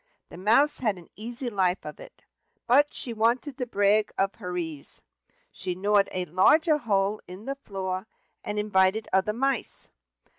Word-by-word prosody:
The 170 - -11
Mouse 230 +10 +3
had 215 -6 0
an 175 - -15
easy 240 +4 -6
life 190 -2 0
of 150 - -8
it, - - -14 0.4
but 280 +5 +4
she 240 - -6
wanted 245 +5 0
to 250 - -2
brag 205 -1 +2
of 195 0 +1
her 180 -2 -4
ease: 160 -5 -6 0.5
she 180 - -4
gnawed 200 +2 +2
a 185 -1 -2
larger 300 - +4
hole 205 -3 0
in 185 +4 -10
the 275 - -2
floor, 190 -6 -5 0.4
and 210 - -4
invited 210 +1 +2
other 190 +2 +2
mice. 265 +1 -2
210 Hz, 160 wpm, -27 LUFS, 185-240 Hz, 0.5 s, but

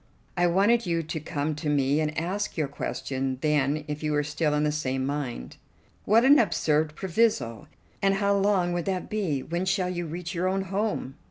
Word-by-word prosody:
I 175 -1 +3
wanted 205 +5 +3
you 165 -1 0
to 160 +1 -4
come 150 0 -2
to 150 0 -3
me, 140 0 +2
and 155 0 -1
ask 195 +5 -3
your 155 -3 +1
question 135 -1 -3
then 150 0 +1
if 150 0 -4
you 150 -1 -1
were 150 0 +2
still 150 +1 0
in 150 - +1
the 150 - +2
same 130 -3 -1
mind." 135 - -4 0.5
"What 225 +4 +5
an 285 +1 +7
absurd 155 -6 +1
proviso! 175 - 0 0.3
And 195 0 +3
how 200 0 +2
long 195 -3 +2
would 175 -1 -2
that 185 -2 -3
be? 180 -11 -1
When 170 +2 -2
shall 185 -1 +1
you 175 -1 -3
reach 170 +2 -5
your 180 +1 0
own 190 +1 0
home?" 195 -8 -2
160 Hz, 195 wpm, -27 LUFS, 150-190 Hz, 0.5 s, an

